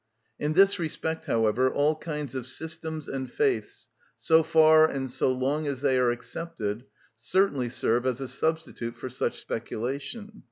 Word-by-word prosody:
In 150 +1 0
this 195 +3 +5
respect, 160 0 -3
however, 115 +3 +2
all 150 +2 +2
kinds 150 -4 -5
of 130 -2 -4
systems 160 +2 -6
and 130 -1 -4
faiths, 420 -3 -1 0.3
so 160 0 +4
far 160 0 +6
and 135 -2 -3
so 130 - +1
long 140 +4 -1
as 135 -2 -3
they 135 -2 +2
are 125 -1 +3
accepted, 120 -3 -4 0.3
certainly 130 - +1
serve 120 0 0
as 130 -1 -1
a 135 - -4
substitute 135 -4 -2
for 120 +2 -7
such 130 - -2
speculation. 140 - -5
140 Hz, 155 wpm, -27 LUFS, 125-160 Hz, 0.3 s, far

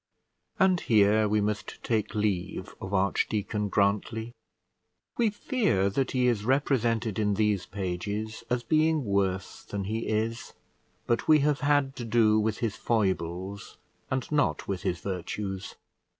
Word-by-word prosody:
And 185 -2 +4
here 110 -2 +4
we 105 0 +2
must 105 0 -3
take 110 -2 -1
leave 105 -4 -2
of 95 - -6
Archdeacon 100 +2 0
Grantly. 105 +4 0 0.8
We 230 -2 +2
fear 205 - 0
that 130 +5 0
he 125 -1 +1
is 115 -5 +1
represented 120 -4 +1
in 105 -1 +1
these 105 -3 +1
pages 100 +3 -4
as 125 -1 0
being 155 -1 +2
worse 95 -2 -1
than 100 -1 -4
he 110 +4 -3
is; 110 +2 -2 0.5
but 120 - 0
we 155 -2 +6
have 145 0 +2
had 145 -2 +2
to 120 - -4
do 110 -2 +3
with 110 0 0
his 105 - -2
foibles, 95 -3 -2 0.3
and 130 -1 -1
not 150 -2 +1
with 95 -2 -2
his 85 -1 -2
virtues. 95 +1 -4
110 Hz, 140 wpm, -28 LUFS, 100-125 Hz, 0.8 s, we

